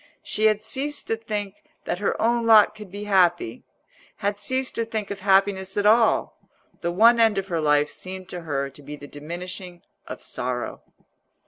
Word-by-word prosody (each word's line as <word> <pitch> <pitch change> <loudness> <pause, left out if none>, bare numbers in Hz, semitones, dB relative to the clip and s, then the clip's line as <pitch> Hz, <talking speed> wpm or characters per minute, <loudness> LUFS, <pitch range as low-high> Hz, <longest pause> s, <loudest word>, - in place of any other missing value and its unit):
She 215 - -1
had 215 0 +1
ceased 280 +5 -2
to 225 - +2
think 210 -3 -5 0.3
that 175 - -2
her 205 - -1
own 235 0 +1
lot 215 -2 +7
could 210 -2 -11
be 205 +3 -7
happy—had 190 - -1
ceased 260 +5 -1
to 230 - -1
think 220 -3 -4
of 200 - -5
happiness 190 0 +2
at 205 - +1
all: 225 +1 +3 0.4
the 170 - -2
one 230 +6 +5
end 225 -3 +4
of 195 0 -2
her 165 -2 -1
life 150 -1 +2
seemed 185 0 -6
to 180 - -6
her 140 -4 -2
to 140 - -12
be 145 +1 -8
the 145 - -11
diminishing 175 +4 -7 0.2
of - - -7
sorrow. 125 -1 -4
195 Hz, 180 wpm, -24 LUFS, 175-220 Hz, 0.4 s, lot